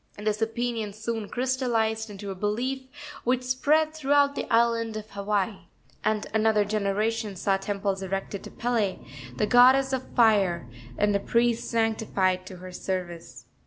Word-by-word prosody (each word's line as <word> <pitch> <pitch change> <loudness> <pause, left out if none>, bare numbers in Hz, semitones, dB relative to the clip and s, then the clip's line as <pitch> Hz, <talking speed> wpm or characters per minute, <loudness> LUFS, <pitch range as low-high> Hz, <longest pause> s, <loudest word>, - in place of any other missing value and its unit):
This 210 +1 -1
opinion 225 -2 -2
soon 220 0 -4
crystalized 235 -4 0
into 200 -1 -7
a - - -3
belief 245 +7 -2 0.4
which 250 +1 +1
spread 300 +5 +2
throughout 285 -1 +3
the - - -5
island 230 -1 +2
of 215 0 -8
Hawaii, 200 -2 -2 0.4
and 215 -1 0
another 220 -1 +3
generation 210 +1 -1
saw 195 +1 +1
temples 195 0 -2
erected 195 +1 -4
to - - -7
Pele, 230 -5 -1 0.4
the 170 - +1
goddess 260 +3 +5
of 260 -1 -3
fire, 200 - +3 0.3
and 205 -1 +1
priests 235 -1 +1
sanctified 210 -5 0
to 185 - -8
her 185 +1 -10
service. 175 -9 -5
215 Hz, 140 wpm, -26 LUFS, 200-240 Hz, 0.4 s, goddess